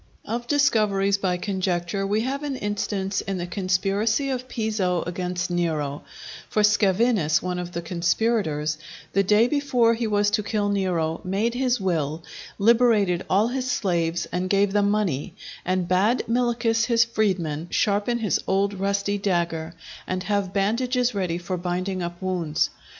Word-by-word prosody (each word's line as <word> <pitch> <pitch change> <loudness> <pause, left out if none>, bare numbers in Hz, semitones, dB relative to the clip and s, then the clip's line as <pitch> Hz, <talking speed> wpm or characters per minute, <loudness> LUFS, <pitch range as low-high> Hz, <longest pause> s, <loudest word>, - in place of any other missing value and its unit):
Of 240 +1 -4
discoveries 210 -9 +2
by 185 -2 0
conjecture 185 0 -1
we 210 +2 +1
have 270 +4 -2
an 290 -2 -3
instance 205 -3 -2
in 195 -1 -3
the 175 - -3
conspiracy 200 +7 0
of 255 -1 -3
Piso 210 -6 -1
against 180 0 -3
Nero; 155 -5 -1 0.5
for 210 - +1
Scaevinus, 205 -5 +3
one 180 0 -2
of 175 0 -6
the 170 0 -4
conspirators, 170 -3 0 0.3
the 195 - +4
day 210 +4 +4
before 250 -5 +2
he 230 0 -2
was 205 -1 +2
to 210 +1 +1
kill 205 0 -1
Nero, 175 -5 0
made 200 +6 0
his 250 -1 +1
will, 160 -4 -1 0.3
liberated 215 -5 +3
all 205 +5 +3
his 255 0 -2
slaves 170 -7 0
and 180 +1 -2
gave 200 0 +2
them 205 -1 +3
money, 190 -5 -1 0.3
and 185 -1 0
bade 200 +7 +2
Milichus, 235 -1 +1
his 235 -1 +4
freedman, 185 -9 -1
sharpen 210 +3 +1
his 220 -4 0
old 195 +1 +1
rusty 200 +1 -1
dagger, 170 -4 -1 0.3
and 185 0 -2
have 200 -2 -1
bandages 245 +5 +1
ready 180 -4 -1
for 180 +1 -4
binding 180 +2 -2
up 175 0 -5
wounds. 180 -5 -1
195 Hz, 150 wpm, -24 LUFS, 180-220 Hz, 0.5 s, the